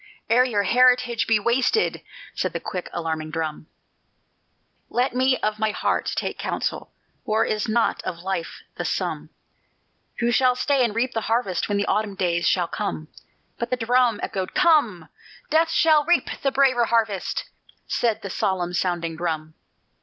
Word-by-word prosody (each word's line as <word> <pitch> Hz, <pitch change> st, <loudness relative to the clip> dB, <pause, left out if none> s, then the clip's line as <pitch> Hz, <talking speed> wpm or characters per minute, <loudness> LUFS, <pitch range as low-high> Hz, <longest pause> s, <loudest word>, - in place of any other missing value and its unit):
Ere 245 Hz, +2 st, +6 dB
your 215 Hz, -5 st, 0 dB
heritage 250 Hz, +2 st, +3 dB
be 225 Hz, -, +4 dB
wasted," 250 Hz, -, +1 dB, 0.3 s
said -, -, -2 dB
the -, -, -2 dB
quick 180 Hz, -3 st, -5 dB
alarming 160 Hz, -2 st, -3 dB
drum. 155 Hz, -1 st, -4 dB, 1.2 s
"Let 245 Hz, +2 st, 0 dB
me 255 Hz, +1 st, +2 dB
of 215 Hz, 0 st, -1 dB
my 220 Hz, 0 st, +1 dB
heart 210 Hz, -, -1 dB
take -, -, -3 dB
counsel: -, -, -3 dB, 0.3 s
War 220 Hz, -2 st, +1 dB
is 215 Hz, -1 st, -1 dB
not 230 Hz, +1 st, +1 dB
of 170 Hz, -, -5 dB
life 175 Hz, -1 st, -4 dB
the -, -, -2 dB
sum; -, -, -3 dB, 0.9 s
Who 235 Hz, 0 st, +1 dB
shall 250 Hz, 0 st, +3 dB
stay 270 Hz, +1 st, +2 dB
and 225 Hz, -3 st, -1 dB
reap 250 Hz, +2 st, 0 dB
the 225 Hz, -, -1 dB
harvest 225 Hz, -6 st, 0 dB
When 205 Hz, -, +1 dB
the 200 Hz, -, 0 dB
autumn 210 Hz, -2 st, -1 dB
days 170 Hz, -3 st, 0 dB
shall 175 Hz, -2 st, +2 dB
come?" 155 Hz, -7 st, -4 dB, 0.5 s
But 235 Hz, -, -3 dB
the 255 Hz, -, 0 dB
drum 240 Hz, -1 st, +2 dB
Echoed: 190 Hz, -2 st, -4 dB
"Come! 290 Hz, -, +3 dB, 0.4 s
Death 325 Hz, +1 st, +3 dB
shall 315 Hz, -2 st, +4 dB
reap 345 Hz, +3 st, +2 dB
the 275 Hz, -, +1 dB
braver 260 Hz, -3 st, +3 dB
harvest," 220 Hz, -5 st, 0 dB, 0.4 s
said 230 Hz, -3 st, -1 dB
the 200 Hz, -, -5 dB
solemn 180 Hz, -2 st, -1 dB
sounding 175 Hz, -2 st, -1 dB
drum. 160 Hz, -2 st, -3 dB
220 Hz, 160 wpm, -23 LUFS, 180-250 Hz, 1.2 s, Ere